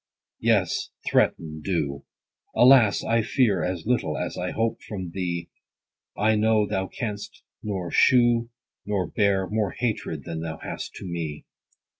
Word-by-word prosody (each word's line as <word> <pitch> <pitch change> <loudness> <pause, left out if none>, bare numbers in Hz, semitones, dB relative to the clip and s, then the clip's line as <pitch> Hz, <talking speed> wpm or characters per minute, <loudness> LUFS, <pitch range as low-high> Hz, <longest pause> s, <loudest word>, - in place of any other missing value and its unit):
Yes, - - +1 0.2
threaten, 80 -1 +1
do. 75 -7 -2 0.5
Alas, 120 -4 +6
I 115 0 +2
fear 115 - +2
As 90 -2 -3
little, 105 -11 0
as - - -3
I 90 0 -3
hope 115 +2 -1
from 95 -5 -6
thee: 85 -2 -3 0.7
I 110 +2 +3
know 110 0 +3
thou 95 -1 -2
canst 105 -1 -6 0.2
nor 95 -5 -4
shew, 120 - +4 0.3
nor 100 -3 -1
bear 95 +2 +1
More 105 -1 -1
hatred, 105 - -2
than 80 -1 -5
thou 80 -1 -5
hast - - -6
to - - -8
me. 80 -4 -5
100 Hz, 140 wpm, -25 LUFS, 85-110 Hz, 0.7 s, Alas